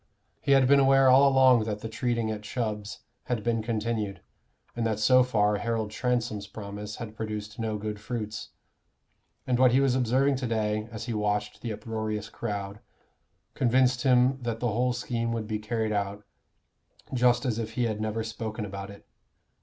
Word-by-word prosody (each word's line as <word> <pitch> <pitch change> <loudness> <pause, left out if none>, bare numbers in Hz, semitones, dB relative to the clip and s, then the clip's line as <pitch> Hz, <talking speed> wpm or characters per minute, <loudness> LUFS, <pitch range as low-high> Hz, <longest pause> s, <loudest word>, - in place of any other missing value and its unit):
He 140 - +3
had 135 -2 +5
been 140 +1 +6
aware 135 -1 +5
all 135 +2 +7
along 130 -4 +5
that 105 -1 -3
the - - -4
treating 115 0 -1
at 105 -1 -4
Chubb's 105 -2 -4 0.2
had 120 -4 -2
been 115 -1 0
continued, 110 -3 -2 0.6
and 120 - -2
that 110 -2 0
so 130 +4 +5
far 105 -4 +2
Harold 115 -1 -2
Transome's 115 -4 -1
promise 105 +1 -7
had 110 -3 -8
produced 105 -1 -5
no 110 -1 -1
good 105 0 -5
fruits; 110 -1 -5 1.0
and 125 -1 +1
what 130 -2 +5
he 130 - +5
was 135 -2 +3
observing 130 +2 +2
to 130 -1 -3
day, 110 -1 -1
as 110 0 -6
he 120 - -3
watched 105 0 -1
the 115 - -4
uproarious 110 -1 -4
crowd, 100 -2 -4 0.7
convinced 125 0 +2
him 130 +1 +3
that 115 -2 -3
the 120 -1 0
whole 125 +4 +1
scheme 120 -1 -2
would 115 -2 -3
be 105 0 -3
carried 110 0 -2
out 100 0 -2 0.9
just 125 0 +3
as 115 -3 0
if 110 0 -4
he 125 - 0
had 110 -2 -1
never 110 +1 -2
spoken 110 -1 -5
about 100 0 -7
it. 100 - -13
115 Hz, 175 wpm, -27 LUFS, 105-125 Hz, 1.0 s, all